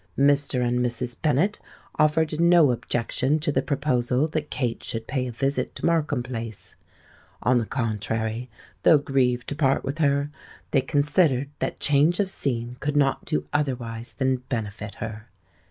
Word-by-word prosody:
Mr. 140 -2 +3
and 125 +1 +1
Mrs. 120 0 -1
Bennet 160 +7 +2 0.3
offered 155 0 +2
no 170 -4 +6
objection 120 +4 0
to 150 -1 -1
the - - +1
proposal 130 -1 0
that 150 -1 -3
Kate 120 -4 -2
should 115 -1 -4
pay 130 0 -2
a - - -4
visit 135 +4 -1
to - - -4
Markham 155 -6 +1
Place: 115 -4 -6 0.7
on 125 0 +4
the 115 - -3
contrary, 115 0 -2 0.3
though 160 - +6
grieved 125 -4 0
to 145 - -3
part 135 -2 +2
with 135 +4 -4
her, 140 -1 +2 0.4
they 135 - +3
considered 145 -1 +2
that - - -3
change 150 +5 +3
of 195 -2 +1
scene 120 -5 -2
could 145 +1 -1
not 135 -2 +2
do 75 0 -1
otherwise 120 -5 -2
than 130 -1 +1
benefit 105 -3 -4
her. 110 0 -7
135 Hz, 155 wpm, -25 LUFS, 120-145 Hz, 0.7 s, no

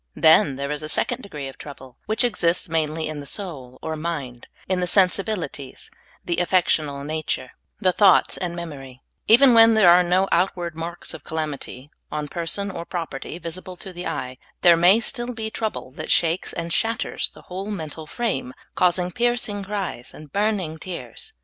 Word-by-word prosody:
Then 155 -3 +5
there 140 +1 -3
is 150 0 -3
a 155 - -3
second 245 +8 +1
degree 150 - -7
of 135 - -11
trouble, 135 -3 -11
which 220 +3 +2
exists 180 -7 +1
mainly 160 -1 -1
in 155 -1 -5
the 140 - -8
soul 135 -11 -6
or 160 0 -3
mind, 150 -7 -5 0.2
in 185 -1 0
the 180 - 0
sensibilities, 185 -7 0 0.3
the 170 -1 -1
affectional 155 -6 +1
nature, 150 -4 -3 0.3
the 185 - +3
thoughts 195 0 +5
and 175 -2 -4
memor>\ 145 -7 -7 0.3
Even 245 +3 +8
when 225 -1 +7
there 195 -6 +7
are 175 +1 +7
no 180 +2 +2
outward 175 -1 +1
marks 165 +2 -5
of - - -9
calamity 150 -3 -5 0.2
on 150 0 -3
person 175 +6 -1
or 170 - -5
property 165 -3 -5
visible 180 +2 -7
to 190 +1 -9
the 175 0 -5
eye, 130 0 -4 0.2
there 175 -1 +8
may 180 +6 +6
still 240 0 -2
be 220 -1 -4
trouble 220 - -3
that 155 +4 -7
shakes 170 +2 +2
and 170 0 -4
shatters 225 +7 -1
the - - -14
whole 190 +3 -6
mental 160 -5 -5
frame, 150 - -2 0.2
causing 180 0 +2
piercing 235 -2 0
cries 195 -11 -4
and 150 -2 -13
burning 200 -6 0
tears. 195 - -7
170 Hz, 175 wpm, -23 LUFS, 150-195 Hz, 0.3 s, Even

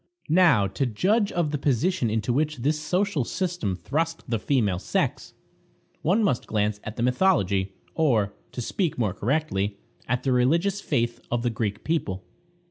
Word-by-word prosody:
Now, 165 - +5
to 100 +8 -1
judge 200 - +1
of 170 -4 0
the 150 - -1
position 140 +1 +1
into 110 +2 0
which 155 +2 0
this 150 +5 0
social 180 -1 0
system 175 - -2
thrust 155 - -2
the 115 -2 0
female 105 -8 +1
sex, - - -2 0.7
one 195 +8 +2
must 155 - 0
glance 105 -1 0
at 110 - -6
the 120 - -2
mythology, 100 - +2 0.2
or, 115 -11 +2 0.2
to 125 - -4
speak 175 - -1
more 105 -6 0
correctly, 105 -5 -1 0.3
at 125 +1 0
the 135 - +1
religious 165 +11 +2
faith 120 -6 -1
of 120 0 -1
the 120 - +1
Greek 110 -2 -3
people. 95 - -2
125 Hz, 160 wpm, -25 LUFS, 105-165 Hz, 0.7 s, Now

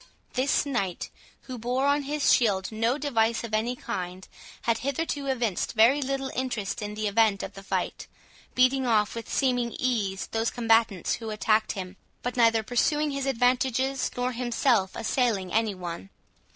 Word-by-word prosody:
This 265 +3 +1
knight, 200 -11 -2 0.3
who 255 -2 -8
bore 250 +4 0
on 285 +1 +3
his 290 +1 +2
shield 195 -5 +2
no 225 +4 0
device 235 -6 +1
of 230 -2 -7
any 230 +3 0
kind, 185 -6 -5 0.4
had 230 -1 +1
hitherto 280 +1 -2
evinced 240 -8 -1
very 235 +6 +5
little 270 0 -2
interest 240 -5 -2
in 210 0 -5
the 215 0 -1
event 205 -1 +2
of 195 - -6
the 195 - -10
fight, 195 - -3 0.5
beating 255 +1 +3
off 215 -3 +2
with 230 0 -7
seeming 245 -3 +1
ease 210 -7 -1
those 225 +1 0
combatants 225 -5 +2
who 225 -2 -6
attacked 215 0 +1
him, 185 0 -7 0.3
but 245 - -3
neither 230 -2 +4
pursuing 295 +6 +1
his 275 -1 -3
advantages, 260 +1 +1
nor 250 +1 0
himself 240 -4 +1
assailing 225 -6 0
any 220 -2 +1
one. 170 - -7
235 Hz, 160 wpm, -27 LUFS, 215-260 Hz, 0.5 s, very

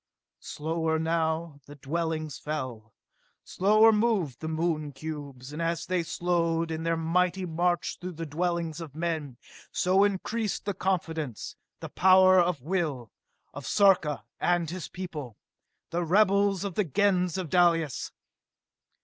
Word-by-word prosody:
Slower 160 +1 -2
now 160 -1 -1
the 145 - -11
dwellings 155 +1 -3
fell, 130 -8 -5 0.5
slower 215 +4 +4
moved 210 - +1
the 160 - -5
Moon 160 -2 -1
cubes; 140 -2 -7
and 155 - -4
as 165 0 -1
they 185 -1 0
slowed 170 -1 0
in 160 0 -3
their 165 0 0
mighty 180 +3 +1
march 175 +1 -1
through 180 0 -5
the 165 +1 -5
dwellings 170 +1 -2
of 150 -4 -9
men, 160 -6 -3 0.3
so 190 +2 +3
increased 205 +2 -1
the 200 - -1
confidence, 165 - -3 0.3
the - - -6
power 185 0 +6
of 175 -7 +1
will, 150 - -2 0.4
of 145 - -8
Sarka 190 -8 +3 0.2
and 175 -2 +1
his 180 -1 -5
people 155 - -7 0.5
the 175 +1 0
rebels 200 +1 +3
of 200 -2 -3
the 210 - +1
Gens 180 +1 +1
of 180 -5 -4
Dalis. 170 -5 +2
165 Hz, 135 wpm, -28 LUFS, 155-185 Hz, 0.5 s, power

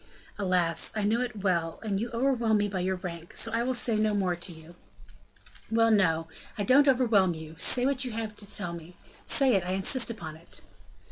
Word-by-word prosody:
"Alas, 180 -4 0
I 215 - -1
know 220 +4 +1
it 240 -5 -5
well, 170 -4 -1
and 200 -3 -2
you 235 +3 -3
overwhelm 235 -2 +1
me 205 0 0
by 195 -2 -4
your 190 +1 -1
rank; 170 -2 -8
so 225 - 0
I 230 +1 0
will 255 +1 -1
say 235 -2 +1
no 215 -1 +1
more 185 -3 0
to 175 +1 -3
you." 160 +1 -14 1.0
"Well, 225 0 +3
no, 165 -6 +2 0.3
I 205 - -1
don't 280 +7 +4
overwhelm 225 -9 +3
you; 160 0 -10
say 250 0 +5
what 270 -1 +1
you 250 - -3
have 220 -1 -5
to 205 0 -6
tell 175 -5 0
me 170 +1 -11 0.3
say 270 -3 +5
it, 195 -3 +1
I 180 +1 -3
insist 210 +7 +3
upon 165 -9 -7
it." 170 +2 -12
205 Hz, 210 wpm, -27 LUFS, 175-230 Hz, 1.0 s, say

